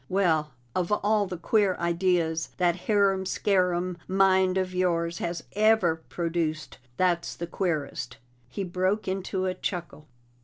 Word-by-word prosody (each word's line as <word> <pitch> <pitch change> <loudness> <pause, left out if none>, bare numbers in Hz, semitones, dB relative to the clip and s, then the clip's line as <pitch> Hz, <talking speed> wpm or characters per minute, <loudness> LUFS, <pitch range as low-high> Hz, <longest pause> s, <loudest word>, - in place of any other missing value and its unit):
"Well, 170 -5 +2 0.2
of 180 +1 -1
all 210 0 +2
the 180 -1 -5
queer 195 +2 +2
ideas 170 -2 0
that 175 -2 +2
harum 200 -3 +3
scarum 180 -2 0
mind 190 -1 +3
of 185 -1 -1
yours 170 -2 0
has 170 0 -3
ever 210 -6 +3
produced, 165 -4 -2 0.2
that's 175 -2 +1
the 170 - -4
queerest!" 150 -8 -3 0.3
He 195 +10 -4
broke 185 +3 -1
into 190 0 -2
a 185 - 0
chuckle. 170 -5 -5
180 Hz, 130 wpm, -27 LUFS, 170-190 Hz, 0.3 s, harum